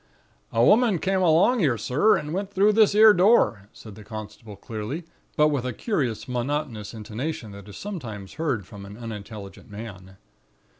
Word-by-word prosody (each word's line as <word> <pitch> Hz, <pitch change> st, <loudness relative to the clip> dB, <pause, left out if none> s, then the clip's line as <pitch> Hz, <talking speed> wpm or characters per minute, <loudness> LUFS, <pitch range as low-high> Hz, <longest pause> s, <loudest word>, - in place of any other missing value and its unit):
"'A 115 Hz, +1 st, +3 dB
woman 220 Hz, -3 st, +4 dB
come 190 Hz, +3 st, 0 dB
along 180 Hz, +7 st, +4 dB
'ere, 130 Hz, -6 st, +2 dB
sir, 130 Hz, -, +3 dB
and 150 Hz, +1 st, -5 dB
went 195 Hz, +2 st, -3 dB
through 205 Hz, +2 st, +3 dB
this 215 Hz, -1 st, +4 dB
'ere 215 Hz, 0 st, +8 dB
door,' 180 Hz, -, +3 dB
said 110 Hz, -, -12 dB
the 105 Hz, -, -12 dB
constable, 110 Hz, 0 st, -9 dB
clearly, 115 Hz, -, -6 dB, 0.3 s
but 150 Hz, 0 st, +5 dB
with 140 Hz, -5 st, -1 dB
a 125 Hz, -1 st, -3 dB
curious 130 Hz, -, -2 dB
monotonous 125 Hz, -3 st, -3 dB
intonation 110 Hz, +2 st, -5 dB
that 100 Hz, 0 st, -11 dB
is 100 Hz, -, -10 dB
sometimes 115 Hz, -, -7 dB
heard 140 Hz, -, -2 dB
from 100 Hz, 0 st, -11 dB
an 100 Hz, +1 st, -10 dB
unintelligent 105 Hz, -3 st, -9 dB
man. 95 Hz, -3 st, -10 dB
120 Hz, 165 wpm, -25 LUFS, -, 0.3 s, ere